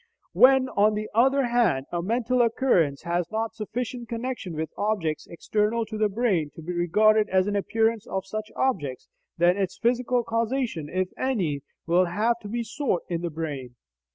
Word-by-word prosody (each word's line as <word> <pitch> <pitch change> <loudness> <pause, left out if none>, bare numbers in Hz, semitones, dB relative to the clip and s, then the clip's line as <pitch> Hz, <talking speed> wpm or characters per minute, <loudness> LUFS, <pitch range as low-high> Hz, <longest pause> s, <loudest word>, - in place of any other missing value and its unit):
When, 260 0 +6
on 210 -1 +3
the 215 0 -4
other 265 +4 +4
hand, 230 - +2
a 175 - -1
mental 240 +5 +1
occurrence 220 - +2
has 175 0 -1
not 225 +1 -2
sufficient 235 +2 -5
connection 230 -7 -4
with 160 0 -3
objects 200 -7 -1
external 215 +6 -1
to 215 0 -7
the 215 -1 +3
brain 195 -8 0
to - - -9
be 180 +3 -4
regarded 210 +5 +3
as 185 0 +3
an 205 0 -1
appearance 225 +2 0
of 190 0 -3
such 215 +2 -5
objects, 145 - -1 0.3
then 175 +2 +4
its 190 -2 -2
physical 245 +1 +1
causation 230 - -1
(if 185 +1 -1
any) 185 - 0 0.2
will 175 +2 +3
have 220 +7 0
to 210 - -9
be 235 +3 -2
sought 230 - -2
in 170 -1 -2
the 175 - -2
brain. 145 -6 -5
210 Hz, 175 wpm, -26 LUFS, 175-235 Hz, 0.3 s, When